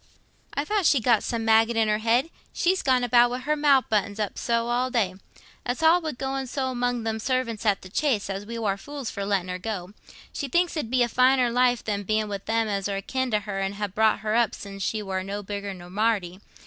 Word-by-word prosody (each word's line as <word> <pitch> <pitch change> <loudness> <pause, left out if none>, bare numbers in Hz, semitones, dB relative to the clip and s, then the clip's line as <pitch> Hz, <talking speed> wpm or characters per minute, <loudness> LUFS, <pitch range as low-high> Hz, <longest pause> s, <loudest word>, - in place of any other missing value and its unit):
"I 285 - -1
thought 410 -2 +1
she'd 265 -6 +3
got 230 -3 +4
some 230 -2 -3
maggot 225 +1 +4
in 225 -1 +3
her 210 0 +1
head, 235 +8 +1 0.2
she's 370 +2 +1
gone 255 -2 +2
about 240 0 +5
wi' 245 - -3
her 295 +4 -1
mouth 285 -3 +4
buttoned 205 -1 0
up 210 -2 -2
so 235 0 0
all 250 +2 +1
day. 220 -8 0 0.5
It's 245 +5 -3
all 335 +3 +6
wi' 315 -2 -3
going 265 +1 -3
so 260 +1 -2
among 245 -1 -1
them 220 0 -2
servants 235 -2 -1
at 200 -2 +2
the - - -9
Chase, 235 -2 0
as 195 0 -4
we 230 +3 -6
war 205 -4 -1
fools 280 +3 -6
for 200 - -4
letting 195 -3 0
her. 180 0 -4 0.5
She 280 - -3
thinks 345 +6 +1
it 310 - -1
'ud - - -13
be 250 0 +3
a - - +1
finer 255 +1 +3
life 245 0 +2
than 205 -2 -2
being 215 +2 0
wi' 200 -1 -3
them 225 +3 0
as 200 -1 -2
are 200 - -2
akin 260 +6 -2
to 210 -2 +1
her 195 -1 -4
and 195 +1 -2
ha' 205 -2 -4
brought 220 -1 +2
her 215 0 -1
up 235 -3 +2
sin' 195 -1 -9
she 210 +2 -2
war 190 -1 -2
no 200 +2 -5
bigger 200 0 -5
nor 180 -2 -10
Marty. 200 -3 0
225 Hz, 240 wpm, -25 LUFS, 205-255 Hz, 0.5 s, all